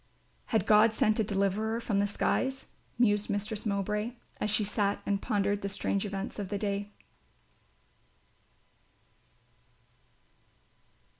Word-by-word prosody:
"Had 220 Hz, -, +1 dB
God 215 Hz, +1 st, +6 dB
sent 220 Hz, -2 st, +2 dB
a -, -, +4 dB
deliverer 205 Hz, +3 st, 0 dB
from 215 Hz, -4 st, 0 dB
the 205 Hz, -, +2 dB
skies?" 265 Hz, +6 st, -1 dB, 0.3 s
mused 210 Hz, -3 st, +2 dB
Mistress 210 Hz, +2 st, -2 dB
Mowbray, 210 Hz, +3 st, -1 dB, 0.3 s
as 210 Hz, -, 0 dB
she 210 Hz, +1 st, +3 dB
sat 205 Hz, 0 st, 0 dB
and 200 Hz, -1 st, 0 dB
pondered 205 Hz, 0 st, 0 dB
the 200 Hz, -, -2 dB
strange 200 Hz, +1 st, -1 dB
events 195 Hz, +1 st, -5 dB
of 200 Hz, -2 st, -4 dB
the 205 Hz, -, -1 dB
day. 200 Hz, 0 st, -2 dB
205 Hz, 120 wpm, -30 LUFS, 200-220 Hz, 0.3 s, God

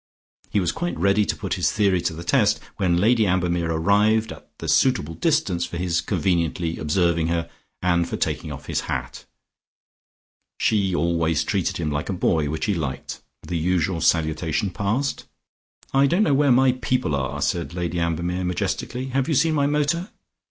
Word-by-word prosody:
He 105 Hz, -, +1 dB
was 90 Hz, -3 st, 0 dB
quite 175 Hz, +1 st, -3 dB
ready 100 Hz, +2 st, +3 dB
to -, -, 0 dB
put -, -, -4 dB
his -, -, +1 dB
theory 100 Hz, -4 st, +2 dB
to 85 Hz, -, -1 dB
the 85 Hz, +2 st, -7 dB
test 105 Hz, +2 st, +2 dB, 0.2 s
when 90 Hz, -4 st, +2 dB
Lady 110 Hz, +3 st, +3 dB
Ambermere 90 Hz, -2 st, 0 dB
had 80 Hz, -, 0 dB
arrived 105 Hz, +5 st, +2 dB
at -, -, -12 dB
the -, -, -7 dB
suitable 80 Hz, +3 st, +2 dB
distance 95 Hz, -, 0 dB
for 85 Hz, 0 st, -5 dB
his 90 Hz, -1 st, 0 dB
conveniently 85 Hz, -2 st, -1 dB
observing 85 Hz, +1 st, +1 dB
her, 85 Hz, 0 st, -1 dB, 0.4 s
and 85 Hz, -1 st, +2 dB
for -, -, -3 dB
taking -, -, -2 dB
off -, -, -8 dB
his -, -, -1 dB
hat. -, -, -4 dB, 1.3 s
She 100 Hz, -4 st, +1 dB
always 85 Hz, -2 st, +1 dB
treated 95 Hz, -3 st, -1 dB
him 80 Hz, -3 st, -2 dB
like 75 Hz, +2 st, -3 dB
a -, -, 0 dB
boy, 80 Hz, -4 st, +1 dB
which 80 Hz, +1 st, -2 dB
he 105 Hz, -, +1 dB
liked. 75 Hz, -7 st, -4 dB, 0.2 s
The 85 Hz, -2 st, -3 dB
usual 85 Hz, 0 st, 0 dB
salutation 80 Hz, +3 st, +1 dB
passed. 110 Hz, +9 st, -2 dB, 0.7 s
"I 135 Hz, +1 st, +5 dB
don't 175 Hz, +8 st, +2 dB
know 150 Hz, -, +2 dB
where 140 Hz, 0 st, +3 dB
my 130 Hz, +1 st, +5 dB
people 125 Hz, -, -1 dB
are," 65 Hz, -2 st, -2 dB
said 85 Hz, 0 st, -1 dB
Lady 90 Hz, -1 st, -2 dB
Ambermere 85 Hz, +2 st, -1 dB
majestically. 125 Hz, +8 st, -2 dB
"Have 130 Hz, +1 st, 0 dB
you 160 Hz, -, +1 dB
seen 160 Hz, +4 st, +3 dB
my 140 Hz, -2 st, +2 dB
motor?" 150 Hz, +6 st, 0 dB
90 Hz, 180 wpm, -23 LUFS, 85-110 Hz, 1.3 s, I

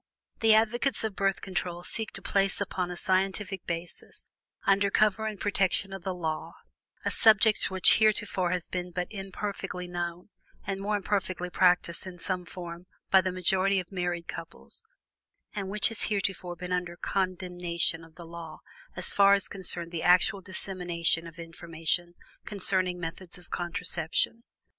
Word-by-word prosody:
The 220 Hz, -1 st, +6 dB
advocates 240 Hz, +5 st, +2 dB
of 220 Hz, -3 st, -2 dB
Birth 195 Hz, 0 st, +1 dB
Control 175 Hz, -2 st, -3 dB
seek 220 Hz, +4 st, -2 dB
to -, -, -7 dB
place 195 Hz, -1 st, +1 dB
upon 185 Hz, -2 st, -2 dB
a 180 Hz, -, -5 dB
scientific 190 Hz, +1 st, 0 dB
basis, 170 Hz, 0 st, -6 dB, 0.3 s
under 200 Hz, 0 st, +4 dB
cover 215 Hz, +1 st, +2 dB
and 210 Hz, -3 st, -5 dB
protection 195 Hz, -1 st, +1 dB
of 195 Hz, -, -6 dB
the 185 Hz, +1 st, -3 dB
law, 160 Hz, -3 st, -3 dB, 0.5 s
a -, -, +1 dB
subject 220 Hz, -1 st, +5 dB
which 190 Hz, +3 st, +5 dB
heretofore 210 Hz, -4 st, +2 dB
has 180 Hz, -1 st, -1 dB
been 180 Hz, -1 st, -3 dB
but 180 Hz, 0 st, -2 dB
imperfectly 195 Hz, -2 st, -5 dB
known, 175 Hz, +1 st, -4 dB, 0.4 s
and 195 Hz, 0 st, -3 dB
more 210 Hz, +1 st, 0 dB
imperfectly 190 Hz, -3 st, -1 dB
practiced 180 Hz, -1 st, +3 dB
in 180 Hz, -1 st, -8 dB
some 180 Hz, +1 st, -2 dB
form 175 Hz, 0 st, -8 dB, 0.2 s
by 190 Hz, -, +7 dB
the 185 Hz, 0 st, -1 dB
majority 190 Hz, +2 st, +2 dB
of 180 Hz, 0 st, -7 dB
married 175 Hz, -2 st, -2 dB
couples, 165 Hz, -, -7 dB, 0.7 s
and 195 Hz, -3 st, -3 dB
which 210 Hz, +3 st, +3 dB
has 225 Hz, -2 st, -2 dB
heretofore 190 Hz, -3 st, -2 dB
been 180 Hz, +1 st, -7 dB
under 180 Hz, -1 st, -1 dB
condemnation 180 Hz, -3 st, 0 dB
of 165 Hz, 0 st, -16 dB
the 170 Hz, -, -10 dB
law 165 Hz, -1 st, -8 dB, 0.4 s
so 180 Hz, -, -5 dB
far 200 Hz, +1 st, +5 dB
as 200 Hz, -1 st, +2 dB
concerned 175 Hz, -3 st, -2 dB
the 170 Hz, -2 st, -3 dB
actual 180 Hz, +2 st, +4 dB
dissemination 175 Hz, -3 st, 0 dB
of 165 Hz, +1 st, -12 dB
information 170 Hz, +1 st, -3 dB, 0.3 s
concerning 185 Hz, -3 st, 0 dB
methods 175 Hz, +2 st, -6 dB
of 175 Hz, -2 st, -17 dB
contraception. 175 Hz, +4 st, -1 dB
185 Hz, 155 wpm, -29 LUFS, 175-195 Hz, 0.7 s, by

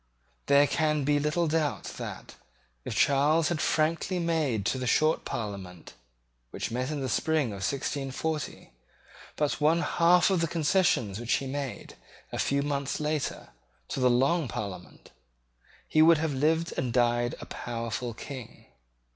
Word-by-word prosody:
There 140 Hz, +1 st, +6 dB
can 150 Hz, 0 st, +1 dB
be 145 Hz, +1 st, +2 dB
little 150 Hz, +4 st, +1 dB
doubt 155 Hz, -1 st, 0 dB, 0.2 s
that, -, -, -7 dB, 0.5 s
if -, -, -4 dB
Charles 150 Hz, +5 st, +3 dB
had 170 Hz, -3 st, -1 dB
frankly 165 Hz, +4 st, +1 dB
made 155 Hz, -, 0 dB
to 130 Hz, -, 0 dB
the 125 Hz, -, -3 dB
Short 155 Hz, +6 st, +2 dB
Parliament, 100 Hz, -6 st, -6 dB, 0.6 s
which 105 Hz, -, -4 dB
met 125 Hz, +3 st, -2 dB
in 150 Hz, -2 st, -3 dB
the 130 Hz, -, -2 dB
spring 155 Hz, 0 st, +1 dB
of 100 Hz, -, -6 dB
1640, 140 Hz, +6 st, -3 dB, 0.6 s
but 150 Hz, 0 st, -1 dB
one 160 Hz, +3 st, +4 dB
half 175 Hz, +2 st, +4 dB
of 185 Hz, -3 st, +2 dB
the 165 Hz, -, +1 dB
concessions 150 Hz, -, +1 dB
which 120 Hz, 0 st, -1 dB
he 135 Hz, -, 0 dB
made, 135 Hz, -1 st, -5 dB, 0.3 s
a -, -, -4 dB
few 140 Hz, 0 st, +1 dB
months 140 Hz, -1 st, -2 dB
later, 150 Hz, -1 st, -2 dB, 0.4 s
to -, -, -3 dB
the 125 Hz, -1 st, +4 dB
Long 135 Hz, +6 st, +2 dB
Parliament, 100 Hz, -4 st, -7 dB, 0.8 s
he 155 Hz, -, +3 dB
would 165 Hz, +1 st, +7 dB
have 155 Hz, -1 st, -1 dB
lived 160 Hz, +5 st, +1 dB
and 125 Hz, -2 st, -1 dB
died 120 Hz, 0 st, +1 dB
a -, -, -8 dB
powerful 115 Hz, 0 st, -4 dB
King. 130 Hz, -1 st, -9 dB
145 Hz, 150 wpm, -28 LUFS, 125-160 Hz, 0.8 s, would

